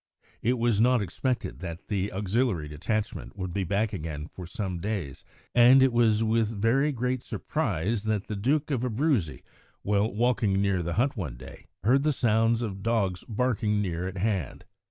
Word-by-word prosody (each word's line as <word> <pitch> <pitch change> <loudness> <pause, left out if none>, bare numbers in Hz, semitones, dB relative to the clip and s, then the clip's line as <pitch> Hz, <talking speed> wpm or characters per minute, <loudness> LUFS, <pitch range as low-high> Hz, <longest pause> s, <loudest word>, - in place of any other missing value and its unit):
It 125 +3 +1
was 115 -3 +2
not 125 +1 +4
expected 120 +6 -2
that 85 -1 -7
the 100 -1 -1
auxiliary 100 -3 0
detachment 105 +10 -3
would 95 -2 -4
be 100 - 0
back 100 +4 0
again 75 -4 -5
for 90 -2 -8
some 90 -1 -4
days, 95 -8 -4 0.3
and 125 +2 +7
it 130 -2 +3
was 115 -2 +3
with 110 0 +2
very 135 +8 +3
great 125 -1 -1
surprise 110 - -2
that 110 -2 0
the 105 - -4
Duke 140 +9 0
of 130 -4 0
Abruzzi, 115 - 0 0.4
while 105 +2 +1
walking 115 -2 +1
near 100 -2 +1
the 85 0 -2
hut 130 +7 +1
one 80 - -4
day, 65 - -12 0.2
heard 130 +5 +4
the 155 +1 +2
sounds 115 -1 +2
of 100 -4 -4
dogs 100 -5 0
barking 110 -2 0
near 90 -3 -2
at 95 +1 -6
hand. 95 - -2
105 Hz, 175 wpm, -27 LUFS, 95-120 Hz, 0.4 s, and